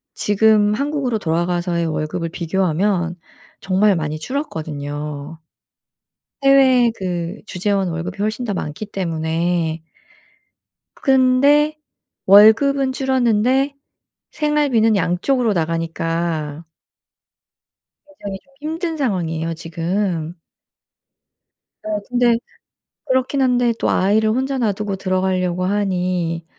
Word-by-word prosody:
지금 210 0 +3
한국으로 275 -1 -1
돌아가서의 175 0 -1
월급을 160 +2 -3
비교하면 175 +1 0 0.5
정말 195 +1 +2
많이 155 -2 -3
줄었거든요. 150 - -5 1.0
해외 260 -3 +5
그 180 0 -4
주재원 195 -1 -1
월급이 165 +3 -5
훨씬 215 +4 -2
더 210 - -2
많기 150 +5 -5
때문에 165 -2 -2 1.1
그 - - -23
근데 275 +3 +4 0.5
월급은 260 +7 +6
줄었는데 260 +1 +1 0.6
생활비는 290 -8 +2
양쪽으로 215 +7 +1
나가니까 165 -2 -2 1.6
굉장히 195 -1 -6
좀 275 - -29
힘든 320 +2 -3
상황이에요 165 - -1
지금. 165 +1 -3 1.5
어 215 -1 -2
근데 245 -1 +3 0.7
그렇긴 260 +1 0
한데 245 -2 +2
또 - - 0
아이를 215 +3 +2
혼자 265 +4 -1
놔두고 210 -3 -1
들어가려고 185 -1 -1
하니 180 -4 -1
195 Hz, 230 characters per minute, -19 LUFS, 170-250 Hz, 1.6 s, 월급은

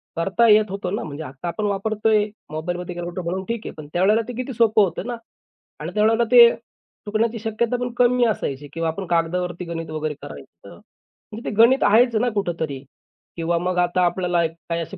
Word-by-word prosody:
करता 195 +8 +2
येत 215 0 +6
होतं 195 -1 -3
ना. - - -4
म्हणजे 150 0 -7
आत्ता 135 +3 -8
आपण 210 +5 -3
वापरतोय 210 +1 +1 0.3
मोबाईलमध्ये 175 +3 -4
कॅक्युलेटर 175 +1 -5
म्हणून 190 +2 -3
ठीक 230 -1 -2
आहे. - - -5
पण 150 -2 -9
त्यावेळेला 200 +6 +3
ते 245 - -5
किती 255 +1 -4
सोपं 220 -2 +4
होतं 185 +3 -3
ना 245 - -3 0.6
आणि - - -6
त्यावेळेला 220 +2 +3
ते 240 -1 +9 0.6
चुकण्याची 225 +2 0
शक्यता 225 +2 -1
पण 245 0 -3
कमी 245 0 +4
असायची 145 - -2
किंवा 165 0 -1
आपण 185 +4 -5
कागदावरती 175 +1 -1
गणित 165 -1 -5
वगैरे 155 -1 -3
करायचं. 70 -2 -12
तर - - -12 0.6
म्हणजे 220 +3 -6
ते - - -4
गणित 235 +5 +5
आहेच 230 +3 +4
ना 240 +3 +2
कुठेतरी. 160 -8 -3 0.5
किंवा 170 +1 0
मग 180 +1 -2
आता 180 +1 +1
आपल्याला 175 -1 +1
काही 165 +1 -5
असे 160 - -7
185 Hz, 190 wpm, -22 LUFS, 170-220 Hz, 0.6 s, ते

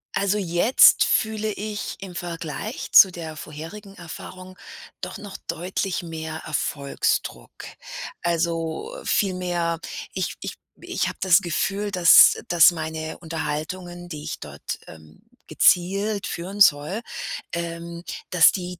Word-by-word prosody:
Also, 200 +1 +1
jetzt 175 +7 +5
fühle 220 -1 0
ich 210 0 -5
im 190 -3 -9
Vergleich 170 - -5
zu 190 -3 +9
der 160 -3 -7
vorherigen 165 +7 -9
Erfahrung 185 +2 -10 0.4
doch 180 +1 -5
noch 205 -2 -9
deutlich 185 +2 -2
mehr 160 -1 -6
Erfolgsdruck. 140 - -2 0.7
Also, 170 - -1
viel 195 -4 +2
mehr, 175 -2 -1 0.3
ich - - -2
ich - - -5 0.3
ich - - -1
habe - - -8
das 185 0 +6
Gefühl, 195 +5 -1
dass 180 -3 +7
dass 175 -1 +7
meine 160 -1 -5
Unterhaltungen, 170 +2 -5
die 150 -3 -7
ich 155 - -5
dort, 70 -1 -7
ähm, 80 - -15 0.3
gezielt 200 +3 +2
führen 190 +4 -5
soll, 150 +7 +4 0.5
ähm, 170 0 -5 0.3
dass 165 -3 +7
die 180 -2 -5
175 Hz, 120 wpm, -24 LUFS, 160-195 Hz, 0.7 s, zu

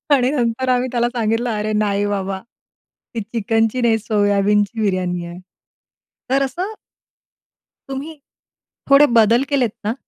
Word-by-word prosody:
आणि 255 0 +1
नंतर 250 -1 -1
आम्ही 250 0 +2
त्याला 240 -1 +1
सांगितलं, 230 +1 0
"अरे, 215 0 -2
नाही 205 -1 +1
बाबा, 195 -1 -2 0.8
ती 225 - -1
चिकनची 225 +2 0
नाही, 230 -2 +3
सोयाबीनची 205 0 +1
बिर्याणी 180 -3 -1
आहे." 170 +1 -9 0.9
तर 270 +1 +2
असं 360 - -4 1.2
तुम्ही 280 +4 -6 0.7
थोडे 275 +1 +7
बदल 230 +3 +5
केलेत 265 -5 +2 0.2
ना, 220 - 0
225 Hz, 125 wpm, -19 LUFS, 205-255 Hz, 1.2 s, थोडे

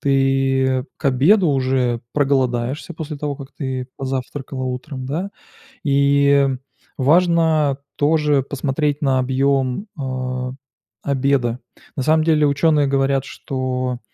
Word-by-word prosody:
ты 135 -1 +2
к - - -21
обеду 155 - +4
уже 130 -3 +1
проголодаешься 135 +1 0
после 155 -1 -6
того, 145 -1 -3
как 135 0 -11
ты 130 -3 -4
позавтракала 135 0 -4
утром, 130 +1 -5
да? 175 +8 -3 0.5
И 140 -1 +3 0.5
важно 160 -1 +3 0.2
тоже 150 -1 +2
посмотреть 145 +2 -2
на 135 -3 +2
объём, 135 - 0
а, 130 -1 -3 0.5
обеда. 135 -3 0 0.4
На 135 - 0
самом 155 +2 +3
деле, 155 -2 +4
ученые 145 0 +2
говорят, 135 -1 +1
что 130 -2 -3
135 Hz, 110 wpm, -20 LUFS, 130-145 Hz, 0.5 s, обеду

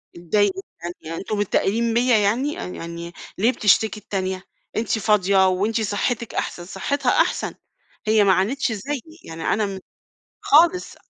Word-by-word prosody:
اتضايقت 195 +4 +1
جدًا، 175 -2 -8
يعني 165 +1 -6
أنتم 210 +1 -3
متّاقلين 225 +3 +1
بيَّ 245 +2 +2
يعني؟ 255 +9 +1
يعني 170 - -7 0.2
ليه 225 +6 +3
بتشتكي 215 -1 +2
التانية؟ 190 -2 -3 0.3
أنتِ 220 0 0
فاضية 195 -2 +3
وأنتِ 215 +5 0
صحتِك 220 +3 -1
أحسن، 175 - -3
صحتها 255 +8 -1
أحسن، - - +1 0.5
هي 215 -1 +5
ما 190 -1 +5
عانتش 225 +7 0
زيي 250 +6 -3 0.3
يعني 165 0 -7
أنا 215 0 +1
م 195 -1 -5 0.6
خالص. 340 +4 +4
205 Hz, 140 wpm, -22 LUFS, 190-230 Hz, 0.6 s, هي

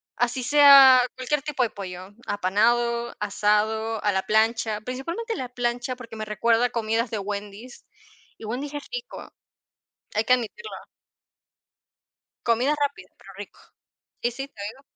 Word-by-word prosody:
así 245 +2 -1
sea 275 -2 +8
cualquier 260 +3 -1
tipo 295 -3 -3
de 230 - 0
pollo: 185 -2 -8 0.2
apanado, 235 +5 +1
asado, 210 +2 0
a 205 - +2
la 190 -1 -1
plancha. 220 0 +1
Principalmente 335 - -4
a - - -5
la 250 -2 -5
plancha, 245 +1 -2
porque 235 -3 -11
me 215 0 -5
recuerda 230 +3 +2
a - - 0
comidas 230 0 -1
de 220 - -2
Wendy's 205 +4 -7 0.5
y 220 - -10
Wendy's 270 +6 -4
es 290 - -5
rico, - - -7 0.9
hay 215 +1 +1
que 250 - +5
admitirlo. 255 - -5 1.8
Comida 245 +6 +2
rápida, 285 -1 -2
pero - - -14
rico. - - -11 0.6
Y 240 - +1
sí, 270 +3 -7
te 205 -7 -11
digo. 260 - -16
235 Hz, 150 wpm, -24 LUFS, 215-260 Hz, 1.8 s, sea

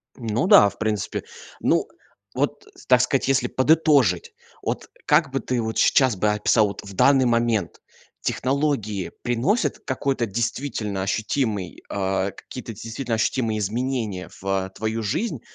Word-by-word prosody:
Ну 115 +5 -1
да, 200 - +8
в 100 - -16
принципе. 110 -3 -2 0.4
Ну, - - +2 0.5
вот, - - -2 0.2
так - - +6
сказать, - - +1
если 135 -2 +2
подытожить, 155 - +3 0.3
вот, - - -3 0.2
как 145 -5 +3
бы 135 - -1
ты, 125 -3 -1
вот, 110 0 -3
сейчас 130 -5 +4
бы 105 +3 +1
описал, 105 +1 +3
вот, 100 - -6
в 100 - -10
данный 135 +6 +4
момент: 115 -5 0 0.4
технологии 130 - -1
приносят 120 - 0
какой-то 130 -2 -1
действительно 115 -2 -2
ощутимый 105 -1 -2
э, 95 0 -1
какие-то 115 +4 -9
действительно 115 +3 -4
ощутимые 110 0 0
изменения 110 -2 -2
в, - - -17
э, 95 -1 0
твою 110 +3 -3
жизнь, 205 - -2
115 Hz, 140 wpm, -23 LUFS, 105-130 Hz, 0.5 s, да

